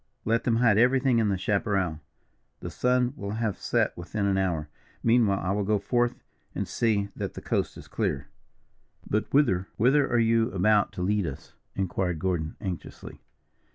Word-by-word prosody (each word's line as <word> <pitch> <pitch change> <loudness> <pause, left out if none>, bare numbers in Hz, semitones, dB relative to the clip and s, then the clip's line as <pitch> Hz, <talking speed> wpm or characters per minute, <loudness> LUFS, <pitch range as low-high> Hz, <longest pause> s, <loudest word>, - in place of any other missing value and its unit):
Let 115 +1 +1
them 120 - +2
hide 115 -3 +4
everything 125 0 +3
in 110 -2 +2
the 95 - 0
chaparral; 100 -5 0 0.6
the - - -6
sun 125 0 +1
will 100 -6 -5
have 110 -2 -2
set - - +1
within 100 +4 -3
an 100 -1 +2
hour. 85 -5 -1 0.4
Meanwhile, 115 -4 +3
I 90 - -2
will 100 +1 0
go 105 +2 +2
forth 120 +4 0 0.4
and - - -2
see 105 -4 0
that - - -5
the - - -5
coast - - -1
is - - -11
clear." 65 - -2 0.8
"But 105 +1 -1
whither, 100 -10 +2
whither 135 +5 +3
are 120 - +3
you 115 0 +3
about 105 +2 +3
to 90 - -4
lead 100 -1 +1
us?" 70 - -8 0.2
inquired 90 -2 -1
Gordon, 85 -2 -2
anxiously. 95 -5 -7
105 Hz, 170 wpm, -27 LUFS, 95-115 Hz, 0.8 s, hide